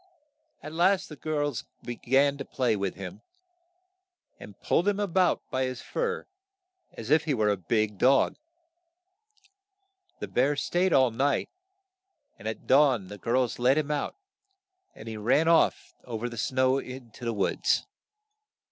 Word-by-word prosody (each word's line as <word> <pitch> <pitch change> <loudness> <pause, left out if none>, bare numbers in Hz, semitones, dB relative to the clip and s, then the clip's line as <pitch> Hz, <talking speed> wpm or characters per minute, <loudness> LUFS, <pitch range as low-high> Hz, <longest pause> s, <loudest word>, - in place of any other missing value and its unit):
At 150 +1 -7
last 185 +3 +2
the 150 - -8
girls 145 -3 -2 0.2
be 120 - -4
gan 140 +4 +2
to - - -3
play 125 -4 0
with 100 -2 -2
him, 100 - -8 1.2
and - - -12
pulled 175 - +1
him 205 0 +1
a 205 - +1
bout 185 -1 +1
by 130 0 0
his 130 -1 -5
fur 470 -1 -2 0.7
as 115 +3 -7
if 155 +1 +4
he 150 -4 +1
were 110 -3 +2
a 100 - +2
big 105 +3 -1
dog. 135 +2 +4 1.8
The - - -4
bear 135 +4 +1
staid 175 +6 0
all 130 -5 +4
night, 135 +5 0 0.9
and - - -7
at 110 - -5
dawn 130 -9 +4
the 105 - -9
girls 120 +3 0
let 130 +4 +4
him 150 -1 0
out, 150 - -2 0.8
and - - -11
he 110 -1 -5
ran 125 +9 +2
off 165 -1 +3
o 120 -3 -5
ver 120 +2 -3
the 120 - -8
snow 130 +3 +1
to 125 -2 -10
the 115 - -1
woods. 100 -3 0
130 Hz, 155 wpm, -27 LUFS, 115-150 Hz, 1.8 s, if